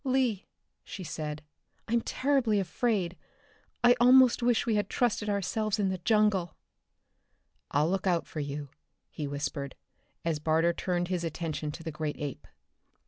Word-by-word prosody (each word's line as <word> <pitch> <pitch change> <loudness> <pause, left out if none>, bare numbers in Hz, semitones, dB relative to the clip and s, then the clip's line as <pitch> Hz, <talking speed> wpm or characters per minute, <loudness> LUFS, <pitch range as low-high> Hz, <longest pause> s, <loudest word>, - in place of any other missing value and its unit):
"Lee," 255 -7 +1 0.4
she 190 - -7
said, 150 -2 -5 0.4
"I'm 235 +1 +2
terribly 255 -5 +1
afraid. 190 -1 0 0.7
I 245 0 +7
almost 250 0 +6
wish 240 -1 +2
we 230 - +1
had 205 -2 0
trusted 220 -3 0
ourselves 210 +2 0
in 200 -2 +1
the 185 -1 -2
jungle." 210 -3 +2 1.1
"I'll 150 +2 +2
look 195 0 -1
out 175 -2 +2
for 155 - -7
you," 145 0 -4 0.4
he 150 -3 -4
whispered, 140 -1 -4 0.5
as 160 -3 0
Barter 160 +2 +2
turned 175 0 -1
his 180 -2 -1
attention 155 -2 -3
to 165 - -9
the 160 - -4
great 150 -1 -3
ape. 145 -3 -6
185 Hz, 145 wpm, -29 LUFS, 155-220 Hz, 1.1 s, I